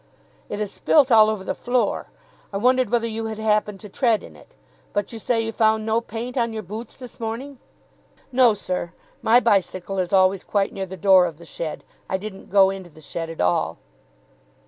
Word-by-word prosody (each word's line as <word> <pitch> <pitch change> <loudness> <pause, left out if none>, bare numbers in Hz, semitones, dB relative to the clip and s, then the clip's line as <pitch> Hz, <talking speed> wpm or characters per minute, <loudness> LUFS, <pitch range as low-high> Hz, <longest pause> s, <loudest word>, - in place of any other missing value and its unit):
"It - - -4
is 210 -2 -2
spilt 280 -4 +3
all 215 -1 +7
over 215 -3 -3
the - - -2
floor. 245 0 -1 0.4
I 195 - -2
wondered 250 +2 +3
whether 235 0 +1
you 225 0 -3
had 220 -1 -5
happened 210 -2 0
to 210 - -9
tread 230 0 +1
in 80 - -12
it. 70 - -19 0.4
But 205 +3 -2
you 225 - -6
say 230 +1 +1
you 225 0 -3
found 220 -1 +2
no 225 +1 +1
paint 235 +3 -5
on 230 -1 0
your 220 -1 -5
boots 215 +5 -8
this 250 -2 -11
morning?" 240 +4 -5 0.7
"No, 250 -4 +5
sir, 180 -3 -4 0.3
my 230 +2 +5
bicycle 195 -4 0
is 180 -1 -1
always 190 0 +3
quite 200 -1 0
near 195 -1 -4
the 190 +1 -8
door 185 0 +5
of 160 -3 -8
the 170 - -13
shed. 160 -1 -5 0.3
I 190 - 0
didn't 195 0 -9
go 195 -1 +5
into 190 -2 -8
the 160 - -18
shed 165 +2 -5
at 165 - -5
all." 90 -1 +1
215 Hz, 205 wpm, -23 LUFS, 190-230 Hz, 0.7 s, all